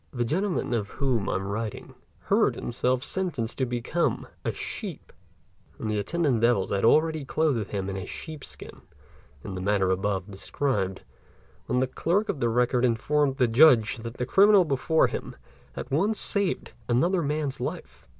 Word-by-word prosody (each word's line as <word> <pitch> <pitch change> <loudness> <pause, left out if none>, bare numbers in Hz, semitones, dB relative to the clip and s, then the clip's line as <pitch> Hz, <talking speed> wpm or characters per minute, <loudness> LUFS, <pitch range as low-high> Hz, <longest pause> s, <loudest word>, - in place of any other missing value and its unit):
The 120 -2 -1
gentleman 180 - -1
of 105 -4 -1
whom 125 -7 0
I - - 0
am 95 +1 -2
writing 110 +1 -5 0.3
heard - - +2
himself 125 +1 -1
sentenced 150 -13 -2
to 130 - +1
become 125 +8 -1 0.2
a - - 0
sheep; - - -7 0.6
and 110 - -3
the 105 - 0
attendant 140 -1 0
devils 115 -5 +2
had 100 -1 0
already 155 +5 +3
clothed 135 -7 0
him 95 -2 -3
in 100 - -3
a 95 - -5
sheep's 155 -3 -8
skin - - -11 0.6
in 95 - -6
the 90 - -5
manner 95 -1 +1
above 95 +1 -1
described, 95 -1 -2 0.6
when 125 +1 +1
the - - +3
clerk 180 +11 0
of 150 - -2
the 120 -2 +1
record 125 +1 +2
informed 135 +4 +1
the 125 -3 +3
Judge 120 -2 +5
that 115 +1 -7
the 125 - -1
criminal 200 - +6
before 155 +2 +2
him - - -4 0.4
had - - -7
once 200 +10 +1
saved 200 -3 0 0.2
another 170 +10 +2
man's 145 -2 -2
life. - - -6
125 Hz, 170 wpm, -26 LUFS, 110-155 Hz, 0.6 s, criminal